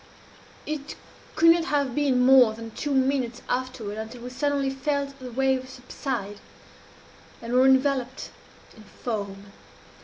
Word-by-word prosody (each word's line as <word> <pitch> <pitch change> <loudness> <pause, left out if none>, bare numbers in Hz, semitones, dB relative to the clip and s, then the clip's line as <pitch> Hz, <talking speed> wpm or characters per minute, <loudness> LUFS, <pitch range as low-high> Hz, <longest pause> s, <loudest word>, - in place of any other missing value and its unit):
"It 300 -1 -5 0.4
could 330 +1 +7
not 335 0 +2
have 285 -6 0
been 260 -3 +2
more 255 -4 +7
than 225 0 -8
two 295 - -4
minutes 260 -3 0
afterwards 250 -5 -3
until 230 +2 -8
we 250 - -7
suddenly 280 0 0
felt 280 0 -2
the 255 -1 -8
waves 260 +1 0
subside, 245 -5 -5 1.0
and 230 +1 -6
were 255 +1 +5
enveloped 265 -1 +1 0.4
in 220 - -15
foam. 200 -2 -6
260 Hz, 130 wpm, -25 LUFS, 235-275 Hz, 1.0 s, could